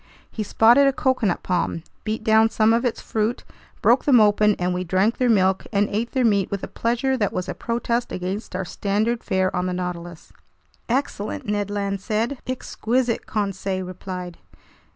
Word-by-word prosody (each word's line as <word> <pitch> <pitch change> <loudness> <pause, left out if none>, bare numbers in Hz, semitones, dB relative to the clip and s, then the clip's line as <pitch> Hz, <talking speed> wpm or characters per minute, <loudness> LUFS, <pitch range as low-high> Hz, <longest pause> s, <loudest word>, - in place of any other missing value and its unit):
He 220 - -4
spotted 235 +6 +5
a 275 - +3
coconut 255 -9 0
palm, 175 -2 -1 0.2
beat 215 +1 -2
down 220 0 +5
some 225 0 +3
of 235 +2 +2
its 240 - -1
fruit, 220 +2 -2 0.4
broke - - +4
them 265 -6 +6
open, 210 0 +4
and 180 0 -1
we 180 0 -2
drank 190 +6 +1
their 250 -1 +2
milk 190 -3 +2
and 205 -1 +2
ate 225 +3 -2
their 260 -3 +2
meat 200 -4 +2
with 200 -1 -4
a - - -3
pleasure 245 +3 0
that 210 -6 0
was 185 - -3
a - - -3
protest 235 0 -2
against 185 +2 -4
our 185 0 -2
standard 215 +6 -1
fare 190 0 0
on 180 0 0
the 180 - -2
Nautilus. 175 -2 -6 0.6
"Excellent!" 235 -5 -2
Ned 205 -1 -1
Land 200 -1 -2
said. 225 +6 -1
"Exquisite!" 250 -1 -1
Conseil 195 -2 -2
replied. 180 -1 -7
210 Hz, 175 wpm, -23 LUFS, 185-230 Hz, 0.6 s, them